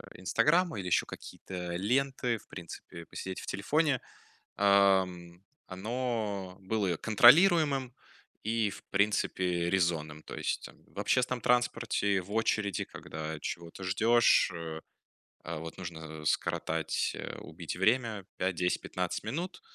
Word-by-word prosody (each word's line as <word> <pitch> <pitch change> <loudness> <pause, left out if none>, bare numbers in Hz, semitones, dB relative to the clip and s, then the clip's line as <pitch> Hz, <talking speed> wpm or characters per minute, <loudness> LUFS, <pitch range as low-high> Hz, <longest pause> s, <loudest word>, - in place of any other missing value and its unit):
"Инстаграм" 155 - +2
или 95 - -4
еще 90 - +3
какие-то 90 -2 -7
ленты, 125 +4 +1
в - - -21
принципе, 85 -1 -9
посидеть 95 +4 -6
в - - -10
телефоне, 145 +7 +1 0.6
ам, 95 -3 +3 0.2
оно 105 -2 -3
было 95 -3 0
контролируемым 135 - +5 0.5
и, 110 -1 +1
в - - -10
принципе, 95 -3 +1
резонным. 80 -5 0
То - - -8
есть, - - -2
там, - - -14
в - - -11
общественном 125 -1 +1
транспорте, 115 -5 +1
в 95 +3 -12
очереди, 110 -3 +1
когда 80 0 -6
чего-то 85 +4 -6
ждешь, 110 +4 +4
э, 80 -2 -6 0.6
а, 85 0 -4
вот, 80 +1 -8
нужно 80 -3 -7
скоротать, 80 +1 0
э, - - -6
убить - - -7
время 110 +1 +1
5-10-15 90 -1 -1
минут. 175 - -4
100 Hz, 120 wpm, -31 LUFS, 85-120 Hz, 0.6 s, контролируемым